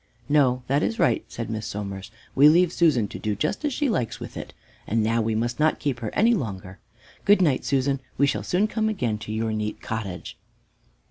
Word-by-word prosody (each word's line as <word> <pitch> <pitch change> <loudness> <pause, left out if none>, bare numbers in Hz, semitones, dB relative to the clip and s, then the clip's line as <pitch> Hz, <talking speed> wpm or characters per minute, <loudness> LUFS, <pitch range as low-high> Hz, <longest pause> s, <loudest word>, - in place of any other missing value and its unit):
"No, 130 -4 +3
that 140 +3 +1
is 225 - -1
right," 125 - +2
said 115 - -6
Miss 110 -1 -4
Somers; 100 -1 -5 0.2
"we 145 +2 +7
leave 175 +2 +4
Susan 145 -11 +3
to - - -7
do 105 -1 -2
just 105 - -2
as 295 - 0
she 290 +3 0
likes 125 - -1
with - - -8
it, - - -7 0.4
and 110 +1 +1
now 115 +1 +1
we 110 0 0
must 120 +2 -2
not 155 +1 +3
keep 140 -6 -2
her 115 -2 -3
any 230 +3 +4
longer. 100 - -4 0.4
Good 205 0 +5
night, 150 -8 +2
Susan, 135 0 +1 0.2
we 140 - +4
shall 140 - 0
soon 185 +4 +1
come 220 0 0
again 120 - -1
to 110 - -7
your 110 0 -1
neat 105 0 -3
cottage." 105 -5 -6
120 Hz, 210 wpm, -25 LUFS, 110-155 Hz, 0.4 s, we